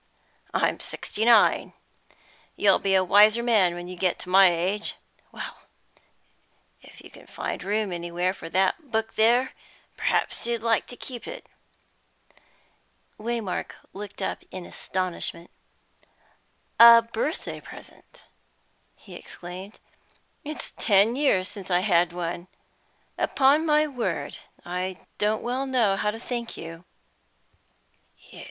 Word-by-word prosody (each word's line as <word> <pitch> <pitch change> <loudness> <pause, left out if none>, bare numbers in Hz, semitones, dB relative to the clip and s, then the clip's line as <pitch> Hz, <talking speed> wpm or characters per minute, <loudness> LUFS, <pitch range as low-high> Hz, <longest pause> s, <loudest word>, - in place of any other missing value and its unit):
I - - +2
am - - -7
sixty 220 - -4
nine. 230 -3 +4 0.8
You'll - - +4
be 195 -1 +1
a 190 - +4
wiser 210 +5 +5
man 205 -7 +3
when 175 0 -7
you 180 - -7
get 180 0 0
to 180 - -7
my 190 0 +7
age. 185 +5 -1 0.4
Well, - - -7 1.3
if - - -16
you - - -13
can - - -16
find - - -5
room 210 0 -1
anywhere 175 +1 -2
for 165 -4 -9
that 190 - 0
book 220 0 -1
there, 240 +4 +3 0.5
perhaps - - 0
you'd 235 -2 -2
like 230 -1 +1
to 245 - -9
keep 245 -3 -8
it!" - - -8 1.7
Waymark 225 -3 -3 0.2
looked 205 +1 -7
up - - -3
in 185 -1 -8
astonishment. 180 -2 -4 1.3
"A 235 0 +10
birthday 230 +8 -4
present!" - - -14 0.7
he - - -15
exclaimed. 185 +4 -9 0.7
"It's 305 +1 -6
ten 210 +2 +4
years 255 -10 +2
since 200 -3 -9
I 180 0 +3
had 175 -3 +3
one. 175 0 -5 0.7
Upon 285 +4 +3
my 300 0 +4
word, 260 -6 -3 0.3
I 180 +1 -4 0.2
don't 215 +1 0
well 255 +3 -2
know 235 -7 +2
how 210 - 0
to 215 - -4
thank 235 -1 -5
you!" 165 +1 -9
205 Hz, 125 wpm, -25 LUFS, 180-235 Hz, 1.7 s, A